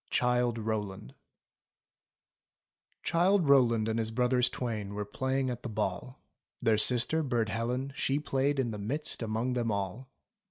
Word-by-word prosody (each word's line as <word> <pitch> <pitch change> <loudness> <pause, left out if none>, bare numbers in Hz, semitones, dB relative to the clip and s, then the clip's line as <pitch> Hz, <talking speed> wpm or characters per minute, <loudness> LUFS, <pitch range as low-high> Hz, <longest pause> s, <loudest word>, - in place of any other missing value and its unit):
CHILDE 125 -1 +1
ROWLAND 105 -3 -4 1.9
Childe 180 0 +3
Rowland 120 -5 +4
and 110 0 0
his 110 -1 -1
brothers 125 +2 +2
twain 105 -5 -4
Were 105 0 -3
playing 130 +4 -1
at 120 0 -6
the 120 - -5
ball. 105 +4 -3 0.4
Their 110 -2 +2
sister, 125 +8 +2
Burd 120 -6 0
Helen, 125 +5 -2
she 135 0 0
played 140 -1 0
In 120 -3 0
the 105 - -5
midst 140 +10 -2
among 115 +3 -1
them 120 -2 0
all. 100 +6 -3
120 Hz, 145 wpm, -30 LUFS, 110-130 Hz, 1.9 s, Rowland